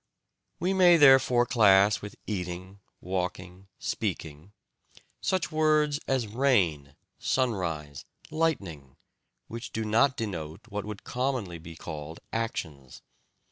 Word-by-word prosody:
We 180 +3 0
may 180 -2 +6
therefore 135 -4 +6
class 105 -4 +4
with 105 0 -8
"eating," 95 -1 -5 0.2
"walking," 90 0 -4
"speaking" 80 +4 -4 1.0
words 155 -1 +2
such - - -20
as 130 -3 +1
"rain," 100 - +1 0.2
"sunrise," 85 - -2 0.3
"lightning," 100 - -2 0.5
which 115 +1 -7
do 110 0 -3
not 115 +5 +3
denote 85 -5 -5
what 105 -1 -4
would 105 -1 -7
commonly 125 -9 -2
be 80 +1 -11
called 80 0 -8
actions. 80 - -5
100 Hz, 105 wpm, -28 LUFS, 85-125 Hz, 1.0 s, may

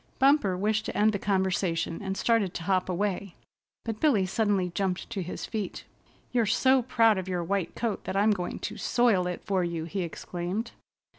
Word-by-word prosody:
Bumper 265 -9 +4
wished 215 +3 0
to - - -4
end 215 +1 +4
the 200 - -2
conversation, 185 -4 0
and 195 -1 -3
started 225 -6 +1
to 170 - -4
hop 185 +1 +1
away, 195 0 -2 0.5
but 225 -2 -3
Billy 240 -12 +3
suddenly 195 -2 +1
jumped 185 0 -1
to 195 - -2
his 180 - -5
feet. 210 -5 -4 0.5
"You're 235 -3 +2
so 260 +5 +4
proud 225 -4 +3
of 185 - -6
your 180 -2 -1
white 190 0 -2
coat 225 -4 -2
that 190 - -2
I'm 210 +2 +4
going 180 -4 -2
to - - -4
soil 225 -7 +2
it 180 - -4
for 190 -3 +1
you," 170 -2 -2
he 190 +3 -3
exclaimed. 180 +6 -4
195 Hz, 190 wpm, -28 LUFS, 180-220 Hz, 0.5 s, Bumper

